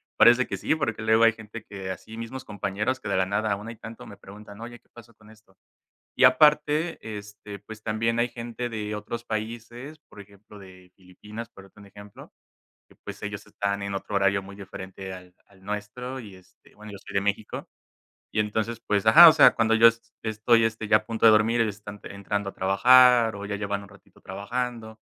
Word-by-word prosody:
Parece 120 +3 +6
que - - -5
sí, - - 0
porque 115 -8 -3
luego 110 +1 +3
hay 115 -1 +5
gente 110 0 -10
que 95 -2 -7
así, 110 +5 -8
mismos 120 +3 -7
compañeros 105 +5 -3
que 105 - -7
de 95 - 0
la 95 - +2
nada 100 +2 -1
aún 105 +2 -4
hay 115 -1 -8
tanto 115 0 -10
me 100 - -11
preguntan: 100 +2 -13
"Oye, 120 +1 -9
¿qué - - -40
pasó 115 -1 -16
con 110 0 -19
esto?" 105 -3 -23 0.6
Y - - +1
aparte, 150 +5 +4 0.2
este, 105 0 -11
pues 110 +1 -12
también 115 +2 -1
hay 120 +1 +1
gente 120 +1 -6
de 105 -2 -4
otros 115 +3 -6
países, 120 +6 -6
por - - -15
ejemplo, 100 +1 -17
de 95 -2 -15
Filipinas, 105 +5 -11
por 100 -2 -16
ponerte 105 - -20
un - - -14
ejemplo, 100 +1 -14 0.6
que - - -21
pues - - -10
ellos - - -6
están 100 0 -3
en 100 0 -4
otro 100 +1 -5
horario 100 0 +2
muy 100 +1 -12
diferente 95 -1 -9
al 90 -1 -13
al 95 -1 -22
nuestro 105 +6 -6
y 105 -6 -11
este 95 -1 -22
bueno, 105 0 -12
yo - - -8
soy - - -13
de 100 - +1
México. 105 +1 -3 0.6
Y 110 - +1
entonces, 110 +2 -2
pues, 105 0 0
ajá, 165 +10 +10
o - - +7
sea, 160 - +6
cuando 115 0 +2
yo 115 +1 +7 0.4
estoy, 115 +1 +2
este, 110 -1 -3
ya 105 - +6
a 110 - -2
punto 115 0 -3
de - - +9
dormir, 110 +2 +3
ellos 105 -3 0
están 100 0 -11
entrando 100 0 -4
a - - -23
trabajar 120 +3 +5
o 100 - -7
ya 105 - -4
llevan 100 -1 -4
un - - -15
ratito - - -21
trabajando. 110 +3 -5
105 Hz, 210 wpm, -25 LUFS, 100-115 Hz, 0.6 s, ajá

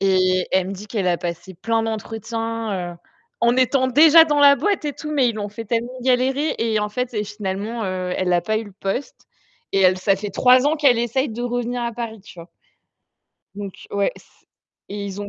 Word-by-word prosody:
Et 185 -1 +2
elle 185 0 +2
me - - -4
dit 200 +2 -9
qu'elle 205 -4 -1
a 175 - +2
passé 175 +2 -6
plein 225 +6 -1
d'entretiens, 225 -3 -4
heu, - - -13 0.4
en 235 +1 +3
étant 260 +1 +2
déjà 315 +5 +7
dans 295 -2 0
la 285 -1 +7
boîte 400 -1 -1
et 295 - -2
tout 300 +3 -7
mais 275 -5 +2
ils 225 - -7
l'ont 205 -1 -4
fait 225 +3 -8
tellement 235 +2 -2
galérer. 265 +4 +1
Et 225 -2 0
en 210 - -1
fait 250 +4 -3
et 210 -1 -1
finalement, 210 +2 -4
heu, 185 -1 -3
elle 180 -1 0
a 175 - +3
pas 215 +3 -1
eu 225 - -5
le 205 - -13
poste 195 +8 -4 0.5
et 195 - +2
elle 185 -1 +4
ça 195 +1 +2
fait 200 +1 -5
3 255 +4 +4
ans 315 - +1
qu'elle 270 -6 +4
essaye 260 +4 0
de 230 +2 -6
revenir 245 0 -2
à 235 - -1
Paris, 225 -2 -6
tu 190 -2 -15
vois? 170 +1 -11 1.1
Donc 200 -2 -8
ouais, 200 -1 0
s - - -18 0.6
et 200 0 -5
ils 200 +1 -6
ont 205 - -5
225 Hz, 220 wpm, -21 LUFS, 195-250 Hz, 1.1 s, déjà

